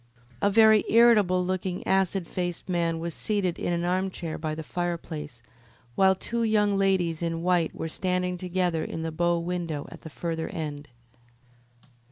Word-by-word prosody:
A - - +4
very 220 0 +6
irritable 210 -6 +5
looking, 185 0 -3
acid 190 -2 +1
faced 175 -1 -4
man 170 -2 0
was 165 0 -4
seated 195 -3 -1
in - - -1
an 170 0 -1
armchair 180 -2 -2
by 155 -1 -3
the 160 - -6
fireplace, 160 -7 -5 0.5
while 190 +6 +4
two 235 +5 -3
young 210 -2 +2
ladies 185 -4 +1
in 165 -1 -2
white 175 -2 +1
were 160 - -4
standing 180 +2 -1
together 180 -2 -1
in 160 - -5
the 160 - -3
bow 175 +2 +1
window 170 -3 -3
at - - -11
the 160 - -9
further 160 +1 -4
end. 150 -2 -5
175 Hz, 160 wpm, -27 LUFS, 165-190 Hz, 0.5 s, very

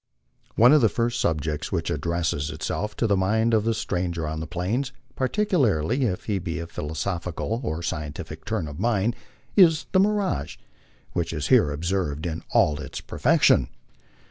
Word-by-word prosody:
One 120 +5 +7
of 155 - +6
the 115 - +5
first 120 +2 -1
subjects 75 -2 -1
which - - -1
addresses 80 -1 -1
itself 80 +7 -3
to - - 0
the 105 -3 +3
mind 110 +5 +2
of 110 -1 +3
the 115 0 +1
stranger 90 -6 -2
on 80 +1 -3
the 80 - -5
Plains, 100 - -2 0.2
particularly 130 - +1
if 95 -6 -2
he 100 -3 -1
be 85 -1 -4
of 85 0 -6
a - - -25
philosophical 90 - -3
or 85 -6 -3
scientific 75 -4 -5
turn 80 - -2
of 75 +1 -8
mind, 115 +1 +1 0.4
is 165 -6 +5
the 185 - +4
mirage, 200 - 0 0.6
which 85 -1 -1
is 75 -4 -3
here 75 - +5
observed 80 0 -2
in 85 -1 -3
all 75 -1 +3
its 70 - -6
perfection. - - +3
90 Hz, 170 wpm, -25 LUFS, 80-115 Hz, 0.6 s, One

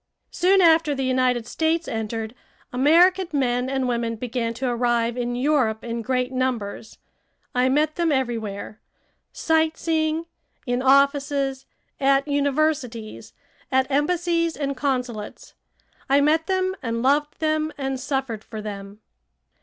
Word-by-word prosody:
Soon 380 +2 +3
after 325 -3 +4
the 270 -1 -2
United 255 -2 +1
States 320 +5 -1
entered, 225 0 -4 0.4
American 345 +8 +4
men 250 -2 0
and 265 -1 -1
women 235 -1 -1
began 230 0 -3
to 255 +2 -2
arrive 240 -1 +1
in 245 -1 -2
Europe 250 -5 +1
in 235 0 -4
great 250 +1 -1
numbers. 240 -5 -3 0.6
I 250 +1 +2
met 300 +3 +1
them 340 -2 +1
everywhere; 225 -6 -3 0.5
sight 320 -1 +1
seeing, 320 0 0 0.4
in 245 -1 -1
offices, 275 0 +2 0.3
at 275 +1 +3
universities, 285 -5 -1 0.4
at 265 +1 +1
embassies 335 +3 +1
and 280 -1 -2
consulates. 250 -6 -3 0.6
I 275 +1 +5
met 315 +3 +2
them 375 0 0
and 230 -2 -2
loved 295 +3 +1
them 310 0 0
and 270 -2 -3
suffered 265 -5 -3
for 220 - -8
them. 205 0 -8
265 Hz, 130 wpm, -23 LUFS, 240-305 Hz, 0.6 s, I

